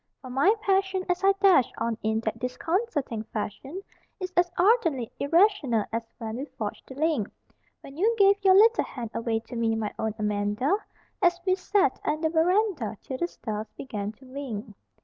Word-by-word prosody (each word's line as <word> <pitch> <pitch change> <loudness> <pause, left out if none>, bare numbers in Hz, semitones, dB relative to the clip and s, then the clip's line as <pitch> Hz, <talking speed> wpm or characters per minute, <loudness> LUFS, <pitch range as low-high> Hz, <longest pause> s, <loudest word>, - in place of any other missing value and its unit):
For 255 - -10
my 285 - +4
passion 385 -2 +1
as 360 +2 -2
I 390 0 +6
dash 375 - +5
on 230 0 -1
in 220 +1 0
that 220 -1 -3
disconcerting 290 - -2
fashion 230 - -5 0.4
Is 370 -1 -5
as 350 0 +3
ardently 345 - +2
irrational 295 - +3
as 230 - 0 0.2
when 225 -1 -5
we 270 - -4
forged 215 -8 -6
the 265 - -10
link 295 -8 0 0.5
When 275 - -12
you 440 +6 +2
gave 400 0 +4
your 380 -1 +6
little 450 +4 +6
hand 235 -4 -7
away 225 -1 -1
to 240 - -10
me, 225 -1 +1
my 220 -2 -3
own 220 -1 -1
Amanda 210 - 0 0.5
An 355 - +7 0.2
we 370 - +3
sat 390 +2 +1
'n 305 +1 -1
the 320 -1 +1
veranda 340 - +1
till 260 -1 -5
the 345 - 0
stars 215 -9 -5
began 210 -6 -4
to 260 +5 -19
wink. 255 -5 -6
275 Hz, 180 wpm, -27 LUFS, 225-375 Hz, 0.5 s, An